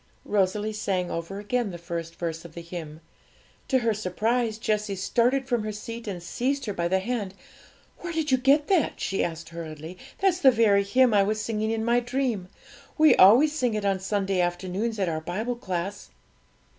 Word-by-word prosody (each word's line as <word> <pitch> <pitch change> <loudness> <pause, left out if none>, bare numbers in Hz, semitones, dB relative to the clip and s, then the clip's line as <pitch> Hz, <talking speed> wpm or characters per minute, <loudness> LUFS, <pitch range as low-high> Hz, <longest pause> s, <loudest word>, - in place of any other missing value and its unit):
Rosalie 205 +2 0
sang 185 -4 -1
over 170 +4 -4
again 215 +2 -1
the 175 - -7
first 170 -1 -6
verse 165 -1 -4
of 170 -2 -12
the 170 - -6
hymn. 165 -2 -8 0.7
To 265 - +3
her 230 -3 +1
surprise, 220 +3 -1
Jessie 210 -2 -1
started 245 +7 +1
from 240 -4 +1
her 215 - -3
seat 230 +2 -7
and 180 -4 -5
seized 265 +9 -1
her 205 - -3
by 170 -2 -1
the 190 +2 +2
hand. 200 -1 -3 0.6
'Where 350 - -5
did 320 -3 -1
you 260 - +4
get 280 +3 +4
that?' 370 -5 +1
she 195 - -1
asked 170 0 -4
hurriedly; 165 +1 -8 0.2
'that's 380 -2 +2
the 270 - +7
very 220 -5 +4
hymn 245 +4 +3
I 205 - +5
was 215 +2 0
singing 215 0 -2
in 225 0 -1
my 240 +1 +3
dream. 245 -6 -2 0.5
We 310 -1 +6
always 245 +11 +7
sing 245 -7 0
it 210 -1 -2
on 195 -1 +1
Sunday 195 -1 0
afternoons 185 +6 -2
at 190 -2 0
our 160 -1 -2
Bible 215 +9 -3
class.' 190 -3 -4
210 Hz, 190 wpm, -26 LUFS, 180-240 Hz, 0.7 s, the